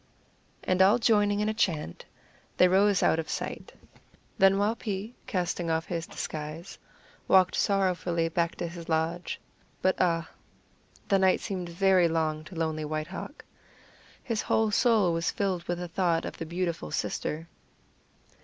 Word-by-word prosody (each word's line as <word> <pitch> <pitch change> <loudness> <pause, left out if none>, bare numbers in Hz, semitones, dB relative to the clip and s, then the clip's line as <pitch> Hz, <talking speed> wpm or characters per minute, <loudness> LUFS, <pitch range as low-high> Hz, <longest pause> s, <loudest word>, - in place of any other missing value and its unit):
And 185 0 +1
all 200 +5 +6
joining 205 -3 +2
in 210 - 0
a 215 - 0
chant, 165 - -1 0.5
they 180 - +6
rose 195 +1 +3
out 160 - +3
of 160 - -4
sight. - - -5 0.7
Then 195 0 +6
Waupee, 210 0 -2
casting 175 -2 -2
off 160 0 0
his 170 -1 -4
disguise, 155 +4 -6 0.5
walked 185 -1 +5
sorrowfully 180 -4 +1
back 170 +1 -1
to 175 - -3
his 170 0 -9
lodge 165 +2 -1 0.4
but 185 - +3
ah, 165 -2 +1 0.8
the 195 -2 +3
night 190 -1 +4
seemed 185 -4 -4
very 185 0 +4
long 155 -1 -1
to 185 - -11
lonely 160 -1 -2
White 155 0 -3
Hawk! 240 - -8 0.8
His 230 -4 -1
whole 220 -1 +1
soul 215 -6 +3
was 165 0 0
filled 190 -3 -1
with 175 - -2
the 175 0 -5
thought 170 -1 0
of - - -7
the 165 - -5
beautiful 170 - -3
sister. 155 - -3
180 Hz, 150 wpm, -28 LUFS, 165-195 Hz, 0.8 s, all